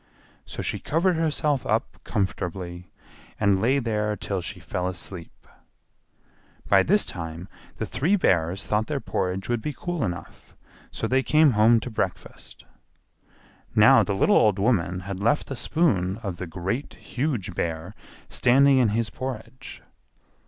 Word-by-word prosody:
So -, -, -5 dB
she -, -, -2 dB
covered 175 Hz, +4 st, +1 dB
herself 150 Hz, -4 st, 0 dB
up -, -, -1 dB
comfortably, 90 Hz, -2 st, -3 dB, 0.5 s
and 100 Hz, -2 st, +3 dB
lay 130 Hz, +5 st, +3 dB
there 105 Hz, -4 st, -1 dB
till 100 Hz, -2 st, -3 dB
she 85 Hz, -, -6 dB
fell 90 Hz, 0 st, -3 dB
asleep. 90 Hz, -1 st, -8 dB, 1.2 s
By 95 Hz, -1 st, +5 dB
this 205 Hz, -, +3 dB
time 85 Hz, 0 st, -6 dB, 0.3 s
the -, -, -2 dB
three 175 Hz, +9 st, +1 dB
Bears 90 Hz, -, +1 dB
thought 105 Hz, +1 st, 0 dB
their 150 Hz, -2 st, -2 dB
porridge 95 Hz, -5 st, -2 dB
would 120 Hz, -2 st, -1 dB
be 150 Hz, -, -3 dB
cool 175 Hz, -4 st, -3 dB
enough, 90 Hz, -4 st, -6 dB, 0.3 s
so -, -, -4 dB
they 130 Hz, +1 st, +2 dB
came 155 Hz, +1 st, +4 dB
home 115 Hz, +1 st, +5 dB
to 125 Hz, -, -6 dB
breakfast. 100 Hz, -4 st, -5 dB, 1.1 s
Now -, -, +7 dB
the 100 Hz, -, -1 dB
little -, -, +4 dB
old 105 Hz, -2 st, +4 dB
woman 95 Hz, -4 st, +1 dB
had 95 Hz, 0 st, -6 dB
left 115 Hz, +9 st, +1 dB
the 135 Hz, -, -6 dB
spoon 105 Hz, -, +1 dB
of 95 Hz, -4 st, -4 dB
the 90 Hz, -, -5 dB
Great, 95 Hz, -, -4 dB
Huge 125 Hz, -, -3 dB
Bear 85 Hz, +3 st, -3 dB, 0.3 s
standing 135 Hz, +2 st, +4 dB
in 120 Hz, -4 st, +4 dB
his 115 Hz, -2 st, -1 dB
porridge. 130 Hz, 0 st, -7 dB
105 Hz, 145 wpm, -25 LUFS, 90-135 Hz, 1.2 s, Now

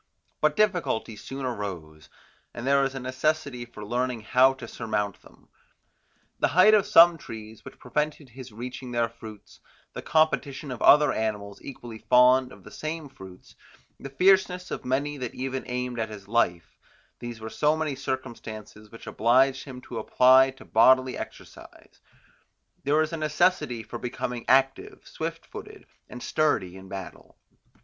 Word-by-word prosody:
But 155 Hz, -1 st, +2 dB
difficulties 175 Hz, -, 0 dB
soon 135 Hz, 0 st, -6 dB
arose, 90 Hz, -10 st, -6 dB, 0.5 s
and 120 Hz, -, -6 dB
there 140 Hz, +1 st, +4 dB
was 135 Hz, 0 st, -1 dB
a -, -, -4 dB
necessity 130 Hz, 0 st, -2 dB
for 105 Hz, -3 st, -10 dB
learning 125 Hz, +1 st, -2 dB
how 130 Hz, +4 st, +4 dB
to 125 Hz, -3 st, -9 dB
surmount 105 Hz, -3 st, -3 dB
them: -, -, -20 dB, 0.9 s
the -, -, +3 dB
height 185 Hz, +8 st, +5 dB
of 205 Hz, -1 st, +4 dB
some 170 Hz, -4 st, +7 dB
trees, 110 Hz, -3 st, -10 dB
which -, -, -12 dB
prevented 150 Hz, +2 st, -3 dB
his 125 Hz, +1 st, -11 dB
reaching 125 Hz, +3 st, -7 dB
their 120 Hz, -1 st, +1 dB
fruits; 110 Hz, -2 st, -13 dB, 0.3 s
the -, -, -6 dB
competition 150 Hz, -3 st, 0 dB
of 125 Hz, -, -7 dB
other 150 Hz, 0 st, +6 dB
animals 105 Hz, -2 st, -3 dB
equally 120 Hz, -4 st, -9 dB
fond 125 Hz, +3 st, +4 dB
of -, -, -15 dB
the -, -, -13 dB
same 155 Hz, -1 st, -5 dB
fruits; 95 Hz, -8 st, -14 dB, 0.5 s
the 135 Hz, -, -8 dB
fierceness 180 Hz, +4 st, +2 dB
of -, -, -5 dB
many 140 Hz, +3 st, -1 dB
that 125 Hz, -3 st, -6 dB
even 130 Hz, 0 st, -4 dB
aimed 125 Hz, -1 st, -3 dB
at 110 Hz, 0 st, -2 dB
his 100 Hz, -2 st, -10 dB
life; 90 Hz, -7 st, -1 dB, 0.4 s
these 120 Hz, -1 st, -7 dB
were 110 Hz, -, -7 dB
so 150 Hz, +1 st, +1 dB
many 155 Hz, -3 st, -2 dB
circumstances, 115 Hz, -5 st, -7 dB
which 115 Hz, -, -13 dB
obliged 130 Hz, +4 st, +2 dB
him 130 Hz, -3 st, -9 dB
to 120 Hz, -2 st, -7 dB
apply 130 Hz, +1 st, +5 dB
to 135 Hz, -, -13 dB
bodily 130 Hz, +3 st, +4 dB
exercise. -, -, -11 dB, 0.8 s
There 145 Hz, +2 st, +2 dB
was 155 Hz, +1 st, +1 dB
a -, -, -2 dB
necessity 155 Hz, -6 st, 0 dB
for 115 Hz, +2 st, -8 dB
becoming 125 Hz, 0 st, -5 dB
active, 135 Hz, +1 st, +1 dB
swift -, -, -5 dB
footed, -, -, -11 dB, 0.2 s
and 125 Hz, -, -9 dB
sturdy 105 Hz, -, 0 dB
in 95 Hz, 0 st, -12 dB
battle. 95 Hz, -2 st, -9 dB
125 Hz, 155 wpm, -26 LUFS, 115-140 Hz, 0.9 s, some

